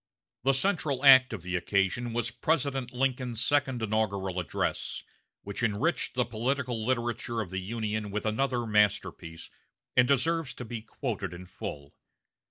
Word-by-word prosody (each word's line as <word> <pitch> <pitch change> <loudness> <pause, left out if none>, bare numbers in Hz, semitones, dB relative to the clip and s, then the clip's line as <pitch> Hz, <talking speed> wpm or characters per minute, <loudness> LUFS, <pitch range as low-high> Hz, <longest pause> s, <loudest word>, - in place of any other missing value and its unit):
The 135 +2 +4
central 145 -4 0
act 130 -1 +9
of 105 -7 -5
the 90 0 -3
occasion 100 +6 0
was 120 +1 -1
President 135 -4 0
Lincoln's 125 -3 0
second 130 -5 +1
inaugural 100 -4 0
address, 90 - -2 0.4
which 100 +2 -5
enriched 120 +11 0
the 125 -1 +2
political 120 0 -2
literature 120 -1 -1
of 100 -5 -3
the 95 - -2
Union 110 +1 -3
with 105 +2 -3
another 120 +2 0
masterpiece, 105 -6 0 0.4
and 125 0 +6
deserves 155 +2 +1
to 125 - -7
be 115 0 -5
quoted 100 - -4
in 90 +1 -9
full. 75 -5 -7
120 Hz, 145 wpm, -29 LUFS, 105-130 Hz, 0.4 s, act